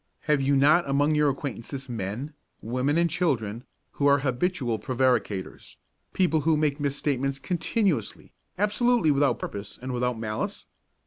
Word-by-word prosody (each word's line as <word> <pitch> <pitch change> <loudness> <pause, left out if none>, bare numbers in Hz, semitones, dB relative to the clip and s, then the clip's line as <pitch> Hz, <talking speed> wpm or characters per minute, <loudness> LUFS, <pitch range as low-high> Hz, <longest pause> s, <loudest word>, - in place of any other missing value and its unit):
Have 150 -2 +1
you 140 +1 +2
not 145 +4 +4
among 145 +2 +2
your 150 -1 +3
acquaintances 135 0 -5
men, 120 +5 -4 0.3
women 125 +6 0
and 170 0 +3
children 120 - -1 0.3
who 145 - 0
are 140 0 +6
habitual 130 -3 -1
prevaricators, 120 -5 -1 0.3
people 170 -4 +2
who 155 +1 +2
make 150 -1 0
misstatements 140 -1 -1
continuously, 175 - -1 0.2
absolutely 210 -2 +2
without 140 0 +2
purpose 100 0 -7
and 130 +1 -5
without 125 -1 -1
malice? 110 -1 -4
140 Hz, 135 wpm, -26 LUFS, 125-155 Hz, 0.3 s, are